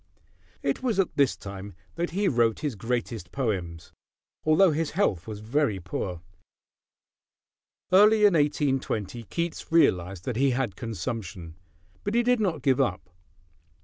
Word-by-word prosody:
It - - -1
was 235 -6 0
at 195 - +1
this 140 -3 +2
time 100 -1 -8 0.2
that 170 +1 -2
he 195 +3 0
wrote 120 - +2
his 150 -4 -1
greatest 115 -3 -3
poems; 95 -11 -3 0.5
although 160 +4 +5
his 155 0 -1
health 100 - +1
was 105 -1 -6
very 115 -2 0
poor. 90 -1 -5 1.7
Early 210 +3 +6
in 205 - +6
1820 135 - 0
Keats 170 - -4
realized 95 - +2
that 120 - -2
he 135 +2 +3
had 125 -7 -1
consumption; 100 -6 -5 0.5
but 205 +3 -2
he 240 - +4
did 245 0 +3
not 170 -9 -1
give 135 -1 +3
up. 95 -8 -2
130 Hz, 140 wpm, -27 LUFS, 100-165 Hz, 1.7 s, Early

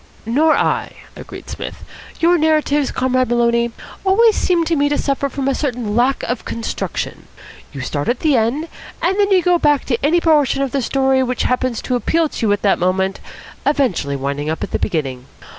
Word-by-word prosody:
"Nor 300 +8 +3
I," - - -1 0.2
agreed - - -10
Psmith. - - -7 0.4
"Your 340 +1 +4
narratives, 300 -2 +2
Comrade 255 -1 0
Maloney, 235 0 +2 0.3
always 425 +3 +4
seem 350 -2 +1
to 330 - +1
me 290 -1 +2
to 290 - 0
suffer 280 0 -1
from 275 -1 -3
a 275 - +2
certain 245 -7 -2
lack 250 +3 +2
of 245 - -3
construction. 230 -1 -4 0.4
You 140 - -7
start 145 +2 -3
at 240 - -1
the 305 -3 +3
end, 245 +8 0 0.3
and 385 +4 0
then 405 -1 +3
you 375 -3 +4
go 355 0 +3
back 295 -3 +2
to 240 -2 -2
any 320 +5 +3
portion 295 -5 +2
of 270 - -3
the 275 - 0
story 265 +1 +1
which 250 -1 -1
happens 255 -2 -1
to 250 - -1
appeal 320 +6 +1
to 230 - -2
you - - +2
at 205 - 0
the 200 - +4
moment, 190 +2 0 0.4
eventually 245 - 0
winding 140 +2 -3
up 160 - -3
at - - -5
the - - -1
beginning. 135 -8 -3
260 Hz, 195 wpm, -18 LUFS, 225-305 Hz, 0.4 s, Your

